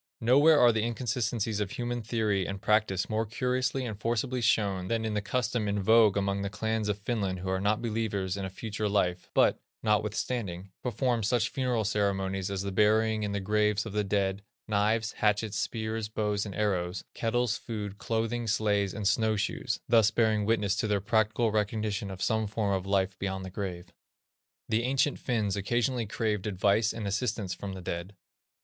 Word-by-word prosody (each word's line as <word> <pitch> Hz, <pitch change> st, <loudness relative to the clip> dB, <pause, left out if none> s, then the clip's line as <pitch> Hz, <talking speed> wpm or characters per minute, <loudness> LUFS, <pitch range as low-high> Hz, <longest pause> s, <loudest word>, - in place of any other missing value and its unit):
Nowhere 145 Hz, +7 st, +6 dB
are 120 Hz, -, +7 dB
the 110 Hz, -1 st, 0 dB
inconsistencies 115 Hz, -2 st, -1 dB
of 105 Hz, -2 st, -1 dB
human 120 Hz, 0 st, -3 dB
theory 105 Hz, -4 st, 0 dB
and 100 Hz, 0 st, -4 dB
practice 105 Hz, -3 st, +1 dB
more 110 Hz, 0 st, 0 dB
curiously 125 Hz, +3 st, -1 dB
and 110 Hz, -4 st, -5 dB
forcibly 120 Hz, +3 st, -1 dB
shown 100 Hz, -5 st, +1 dB
than 115 Hz, +1 st, -1 dB
in 110 Hz, -, -1 dB
the 105 Hz, -, 0 dB
custom 115 Hz, +1 st, -1 dB
in 100 Hz, 0 st, 0 dB
vogue 110 Hz, 0 st, +5 dB
among 100 Hz, 0 st, 0 dB
the 100 Hz, -, -2 dB
clans 110 Hz, +1 st, -2 dB
of 105 Hz, -, 0 dB
Finland 100 Hz, -4 st, -2 dB
who 95 Hz, -, -3 dB
are 95 Hz, 0 st, 0 dB
not 105 Hz, +3 st, +1 dB
believers 105 Hz, -5 st, -1 dB
in 100 Hz, -, -4 dB
a 95 Hz, -, -3 dB
future 105 Hz, +2 st, -3 dB
life, 90 Hz, -3 st, 0 dB
but, -, -, +4 dB, 0.2 s
notwithstanding, 105 Hz, -3 st, -1 dB
perform 125 Hz, 0 st, 0 dB
such 115 Hz, +1 st, +1 dB
funereal 125 Hz, -4 st, 0 dB
ceremonies 95 Hz, -2 st, 0 dB
as 100 Hz, -1 st, -2 dB
the 100 Hz, -, -3 dB
burying 110 Hz, +2 st, +3 dB
in 105 Hz, -1 st, -2 dB
the 100 Hz, -, -1 dB
graves 105 Hz, +1 st, +1 dB
of 110 Hz, -, -6 dB
the 105 Hz, 0 st, +1 dB
dead, 100 Hz, -1 st, 0 dB, 0.3 s
knives, 110 Hz, +1 st, +1 dB
hatchets, 105 Hz, -1 st, 0 dB
spears, 110 Hz, -1 st, -3 dB
bows, 105 Hz, -1 st, -1 dB
and 100 Hz, -, -7 dB
arrows, 90 Hz, -3 st, -1 dB
kettles, 120 Hz, 0 st, 0 dB
food, 105 Hz, -3 st, -6 dB
clothing, 115 Hz, +1 st, -1 dB
sledges 105 Hz, -3 st, +1 dB
and 105 Hz, -2 st, -1 dB
snow 110 Hz, +1 st, +2 dB
shoes, 100 Hz, -, -2 dB
thus 115 Hz, -3 st, +5 dB
bearing 110 Hz, -2 st, +2 dB
witness 105 Hz, -3 st, +2 dB
to -, -, 0 dB
their 105 Hz, -1 st, +1 dB
practical 110 Hz, +2 st, +1 dB
recognition 105 Hz, -1 st, -1 dB
of 95 Hz, 0 st, -5 dB
some 110 Hz, -1 st, +1 dB
form 105 Hz, -1 st, -1 dB
of 95 Hz, 0 st, -2 dB
life 95 Hz, -1 st, 0 dB
beyond 95 Hz, -1 st, -3 dB
the 95 Hz, -, -7 dB
grave. 90 Hz, -3 st, -5 dB, 0.7 s
The 110 Hz, +1 st, +1 dB
ancient 135 Hz, +3 st, +1 dB
Finns 110 Hz, -6 st, 0 dB
occasionally 120 Hz, +3 st, 0 dB
craved 105 Hz, -1 st, -1 dB
advice 105 Hz, +2 st, +2 dB
and 110 Hz, -2 st, -5 dB
assistance 105 Hz, -1 st, -1 dB
from 95 Hz, +1 st, -6 dB
the 95 Hz, -, -7 dB
dead. 85 Hz, +4 st, -5 dB
105 Hz, 180 wpm, -29 LUFS, 100-115 Hz, 0.7 s, are